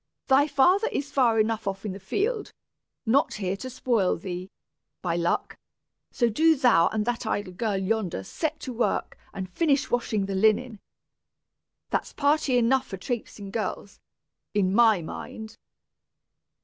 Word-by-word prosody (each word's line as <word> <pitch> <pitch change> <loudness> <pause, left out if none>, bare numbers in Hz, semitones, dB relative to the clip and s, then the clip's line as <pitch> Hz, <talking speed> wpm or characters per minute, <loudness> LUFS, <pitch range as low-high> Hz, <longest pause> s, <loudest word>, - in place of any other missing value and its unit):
"Thy 275 +2 +4
father 330 +9 +3
is 285 0 -3
far 235 -5 +3
enough 220 -1 0
off 195 +1 -3
in 205 - -2
the 195 - -8
field, 415 - -2 0.5
not 260 +6 +2
here 195 -2 -2
to 255 - -6
spoil 235 -6 +1
thee, 180 +1 -6 0.5
by 170 -2 0
luck; 170 0 -1 0.5
so 240 - +1
do 320 +9 +4
thou 245 - +4
and 215 -1 -1
that 240 -1 -2
idle 205 -4 -2
girl 205 +1 -1
yonder 190 - -1
set 310 - -3
to 255 - -5
work 235 +1 -1 0.2
and 190 -2 -5
finish 280 - +1
washing 220 -4 0
the 195 - -4
linen. 215 +3 +2 1.1
That's - - -1
party 285 -3 +2
enough 255 +2 +2
for 195 - -6
trapesing 205 -1 -5
girls, 210 -2 -4 0.6
in 190 -2 +2
my 220 -5 +5
mind!" 220 +6 -8
225 Hz, 150 wpm, -26 LUFS, 195-265 Hz, 1.1 s, my